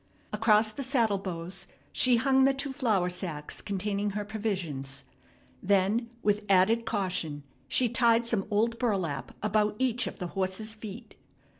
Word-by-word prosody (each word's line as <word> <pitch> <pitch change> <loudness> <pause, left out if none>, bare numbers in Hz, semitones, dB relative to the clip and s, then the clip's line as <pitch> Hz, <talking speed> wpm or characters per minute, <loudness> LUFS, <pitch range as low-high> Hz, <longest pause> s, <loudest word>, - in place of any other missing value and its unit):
Across 215 0 +4
the 280 - -5
saddle 235 -7 +2
bows 180 0 -5 0.2
she 255 -1 +4
hung 265 +2 +3
the 270 0 +4
two 275 0 -3
flour 220 -10 +1
sacks 175 -5 -5
containing 205 +1 -2
her 205 - -3
provisions. 175 -11 -4 0.6
Then 200 +4 +2
with 210 0 +1
added 205 +5 +4
caution 180 -8 -1 0.2
she 255 - +3
tied 235 0 +3
some 220 -4 -1
old 230 +2 +1
burlap 190 - -1
about 210 0 +1
each 255 0 +1
of - - -6
the 180 -3 -5
horse's 195 +3 -1
feet. 215 -3 -10
210 Hz, 145 wpm, -29 LUFS, 185-230 Hz, 0.6 s, Across